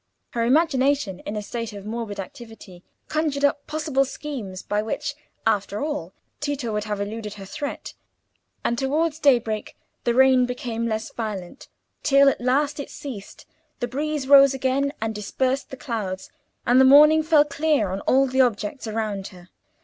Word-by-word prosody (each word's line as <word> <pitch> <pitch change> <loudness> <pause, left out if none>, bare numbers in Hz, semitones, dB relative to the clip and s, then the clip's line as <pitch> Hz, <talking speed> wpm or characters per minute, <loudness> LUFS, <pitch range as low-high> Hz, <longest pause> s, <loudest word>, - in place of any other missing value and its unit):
Her 235 - -1
imagination, 275 - +2
in 205 - -3
a 210 - -3
state 230 0 -5
of 200 -1 -9
morbid 220 -2 -5
activity, 195 -3 -10 0.2
conjured 305 -2 0
up 285 0 0
possible 300 -3 0
schemes 250 -9 -6
by 210 0 0
which, 285 +6 -3 0.3
after 205 -1 0
all, 285 - -3 0.3
Tito 285 -6 -3
would 210 0 -2
have 210 -1 -3
eluded 210 +1 -5
her 195 -2 -9
threat; 285 +9 -6 0.7
and 235 0 0
towards 305 +3 0
daybreak 235 -7 +1 0.3
the 235 - +1
rain 260 -1 +5
became 235 -2 -3
less 220 0 -3
violent, 210 0 -6 0.3
till 275 0 +5
at - - -3
last 275 +4 +1
it 285 - -5
ceased, 235 -9 -9 0.3
the 245 - -1
breeze 290 +2 -3
rose 275 -1 +7
again 270 +2 0
and 225 0 -2
dispersed 255 +6 -1
the 265 - -8
clouds, 205 -8 -4 0.3
and 250 +2 +5
the - - +7
morning 300 +4 +7
fell 310 -1 +4
clear 290 -8 +1
on 190 - -3
all 270 +1 +5
the 260 0 +2
objects 230 0 -1
around 215 -3 -3
her. 180 -2 -15
250 Hz, 165 wpm, -24 LUFS, 210-280 Hz, 0.7 s, rose